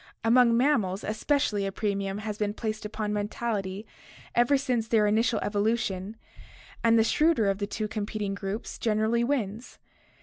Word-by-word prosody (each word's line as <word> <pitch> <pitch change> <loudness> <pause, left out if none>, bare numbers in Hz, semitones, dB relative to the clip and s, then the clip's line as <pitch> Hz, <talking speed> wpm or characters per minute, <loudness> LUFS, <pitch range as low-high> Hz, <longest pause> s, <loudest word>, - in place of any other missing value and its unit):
Among 235 0 +5
mammals 220 -8 +1
especially 215 -1 0
a - - -3
premium 200 -1 -2
has 210 0 -4
been 210 -1 -1
placed 215 -1 -4
upon 210 -1 -3
mentality 205 -1 -3 0.5
ever 240 +4 +4
since 245 -4 -1
their 220 -2 +3
initial 220 +3 +2
evolution, 205 -1 -1 0.7
and 230 0 +5
the 225 - +5
shrewder 300 -1 +3
of 195 0 0
two 215 +1 -2
competing 210 -1 -3
groups 200 +3 -5
generally 220 +1 +1
wins. 235 -4 -2
215 Hz, 140 wpm, -27 LUFS, 205-235 Hz, 0.7 s, Among